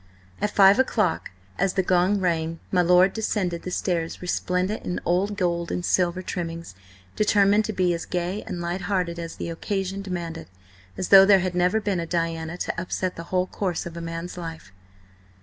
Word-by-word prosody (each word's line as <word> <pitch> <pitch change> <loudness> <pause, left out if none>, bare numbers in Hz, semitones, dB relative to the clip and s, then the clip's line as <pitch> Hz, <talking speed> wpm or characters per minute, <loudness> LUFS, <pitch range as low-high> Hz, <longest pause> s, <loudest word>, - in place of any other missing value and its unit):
At 210 - +1
five 200 +2 +6
o'clock, 215 -9 +1 0.3
as 195 -1 +1
the 190 - +1
gong 185 +3 +2
rang, 165 -2 -1
my 180 - +3
lord 180 +2 +5
descended 190 -6 -1
the - - -6
stairs 170 -2 -2
resplendent 180 +3 -1
in 180 - -3
old 195 +4 +1
gold 170 -2 -1
and 175 - -2
silver 180 0 +1
trimmings, 165 - -5 0.4
determined 205 0 +3
to - - -2
be 180 -2 +2
as 170 - -5
gay 180 +3 -2
and 175 - -4
light 175 +2 -3
hearted 180 -3 -1
as 165 -1 -6
the 170 - -5
occasion 195 +3 -3
demanded, 175 -4 -5 0.5
as 185 - -3
though 195 -1 +10
there 195 -1 +6
had 185 0 -2
never 180 +4 +2
been 200 -4 -1
a 165 - -3
Diana 165 0 -2
to 170 - -3
upset 185 0 -3
the 165 - -7
whole 185 0 +1
course 185 -2 -3
of 170 -1 -7
a 170 - -6
man's 165 +2 -6
life. 165 - -8
180 Hz, 185 wpm, -24 LUFS, 170-195 Hz, 0.5 s, though